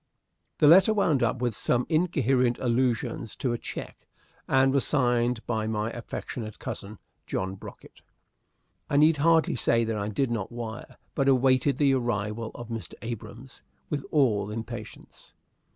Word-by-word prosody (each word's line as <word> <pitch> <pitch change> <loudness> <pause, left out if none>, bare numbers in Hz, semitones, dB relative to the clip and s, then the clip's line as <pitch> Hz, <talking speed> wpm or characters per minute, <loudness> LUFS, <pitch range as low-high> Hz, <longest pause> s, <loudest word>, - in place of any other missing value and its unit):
The 150 - +5
letter 190 +7 +7
wound 160 -10 +2
up 120 +1 0
with 120 -3 0
some 125 +3 +1
incoherent 135 -7 +2
allusions 120 -2 -1
to 125 -4 -1
a - - -1
check, - - -8 0.4
and 135 0 +3
was 140 - +2
signed 120 -3 +1
by 110 -2 -1
my 110 0 -2
affectionate 115 -2 -6
cousin, 100 +2 -7 0.3
John 95 0 -2
Brocket. 95 - -12 0.9
I 145 - +1
need 155 +1 +5
hardly 160 +2 +3
say 115 -1 +2
that 110 -1 -2
I 100 - -2
did 120 +4 -1
not 110 -3 -3
wire, 120 0 -7 0.2
but 135 -1 0
awaited 130 +1 +3
the 140 -2 +3
arrival 115 -3 -2
of 120 -1 -8
Mr. 115 -2 -6
Abrahams 115 +3 -8 0.3
with 145 -2 -2
all 110 -9 +2
impatience. 115 +2 -8
120 Hz, 150 wpm, -27 LUFS, 110-135 Hz, 0.9 s, letter